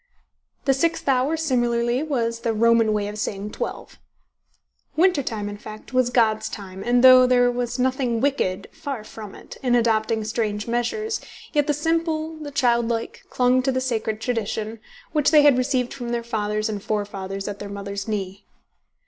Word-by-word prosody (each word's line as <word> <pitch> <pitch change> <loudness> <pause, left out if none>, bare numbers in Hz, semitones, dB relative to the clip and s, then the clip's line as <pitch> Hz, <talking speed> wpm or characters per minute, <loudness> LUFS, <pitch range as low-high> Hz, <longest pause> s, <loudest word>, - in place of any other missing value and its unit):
The 270 - +4
sixth 330 +4 0
hour 270 +4 +2
similarly 240 -4 +1
was 235 -7 -1
the 230 -1 -1
Roman 230 0 +4
way 210 -1 0
of 210 +1 -6
saying 205 0 -3
twelve. - - -6 1.0
Winter 350 -2 +4
time, 215 -5 -4
in 205 0 -6
fact, 215 +4 -11
was 255 -1 +3
God's 220 -3 +2
time, 190 -3 -8
and 245 +1 +2
though 255 -1 +9
there 245 -1 +4
was 245 0 -2
nothing 255 -2 0
wicked 200 -8 0
(far 285 -8 -6
from 215 -2 -10
it) - - -12
in 245 -2 +2
adopting 225 -1 +1
strange 215 -1 -2
measures, 240 - -1 0.3
yet 295 -2 +2
the 295 - +2
simple, 320 +1 -1
the 305 -2 -7
childlike, 235 -4 0
clung 250 0 +3
to 265 - +1
the 260 - 0
sacred 225 -4 -2
tradition, 225 -1 -3 0.3
which 300 -3 +3
they 300 -1 +6
had 290 -3 +6
received 250 -1 0
from 245 -3 -6
their 235 0 -1
fathers 215 -1 -1
and 210 -2 -4
forefathers 195 -2 -3
at 205 -1 -5
their 205 - -6
mother's 200 0 -5
knee. 200 -2 -4
235 Hz, 170 wpm, -23 LUFS, 215-260 Hz, 1.0 s, though